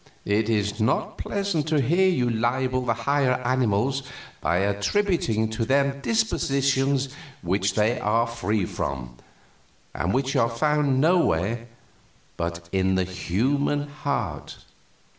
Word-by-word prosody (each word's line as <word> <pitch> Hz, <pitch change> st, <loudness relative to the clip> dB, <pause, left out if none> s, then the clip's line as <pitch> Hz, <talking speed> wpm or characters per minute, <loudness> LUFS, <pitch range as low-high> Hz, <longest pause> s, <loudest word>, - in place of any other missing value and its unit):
It 105 Hz, +2 st, +1 dB
is 105 Hz, -1 st, 0 dB
not 110 Hz, -, 0 dB
pleasant 200 Hz, -7 st, -1 dB
to 155 Hz, -1 st, +2 dB
hear 170 Hz, +8 st, +3 dB
you 125 Hz, -9 st, +1 dB
libel 125 Hz, +3 st, 0 dB
the 120 Hz, -2 st, 0 dB
higher 135 Hz, +2 st, +1 dB
animals 130 Hz, +1 st, +1 dB, 0.4 s
by 85 Hz, -, +1 dB
attributing 110 Hz, -, +1 dB
to 110 Hz, +1 st, -2 dB
them 140 Hz, +3 st, +1 dB
dispositions 140 Hz, -, +1 dB, 0.3 s
which 95 Hz, +3 st, 0 dB
they 110 Hz, +3 st, +2 dB
are 115 Hz, +3 st, +2 dB
free 110 Hz, -4 st, -1 dB
from, 60 Hz, -6 st, -5 dB, 0.8 s
and 95 Hz, -, -1 dB
which 135 Hz, +4 st, 0 dB
are 115 Hz, -3 st, +3 dB
found 140 Hz, +2 st, +1 dB
nowhere 120 Hz, -, +2 dB, 0.7 s
but 85 Hz, 0 st, -4 dB
in 95 Hz, 0 st, +1 dB
the 95 Hz, -, +2 dB
human 130 Hz, +11 st, -1 dB
heart. 145 Hz, -3 st, -4 dB
120 Hz, 120 wpm, -25 LUFS, 105-140 Hz, 0.8 s, hear